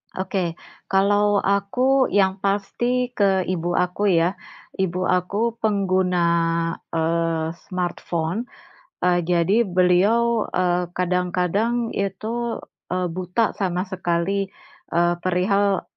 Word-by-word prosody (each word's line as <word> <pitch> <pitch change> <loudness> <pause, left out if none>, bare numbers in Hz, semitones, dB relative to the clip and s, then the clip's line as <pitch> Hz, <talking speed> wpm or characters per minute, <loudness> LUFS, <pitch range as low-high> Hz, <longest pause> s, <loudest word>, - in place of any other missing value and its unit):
Oke, 185 -3 -2 0.3
kalau 205 +1 +3
aku 250 +7 +2
yang 195 -1 +2
pasti 240 +6 -1
ke 195 -5 +2
ibu 175 -1 -2
aku, 180 +3 0
ya. 180 +1 +2 0.4
Ibu 185 -1 0
aku 205 +6 0
pengguna, 185 -4 +1 0.7
eee, 165 0 0 0.2
smartphone, 180 +3 -3 0.6
eee, 180 -1 +3
jadi 180 +6 +2
beliau, 200 +6 +3
eee, 180 -1 0
kadang-kadang 180 +6 0
itu, 220 +5 -3 0.3
eee, 180 0 -1
buta 185 +5 0
sama 180 -2 0
sekali, 185 +1 -1 0.5
eee, 175 0 +3
perihal, 190 +2 +1
190 Hz, 100 wpm, -22 LUFS, 180-205 Hz, 0.7 s, kalau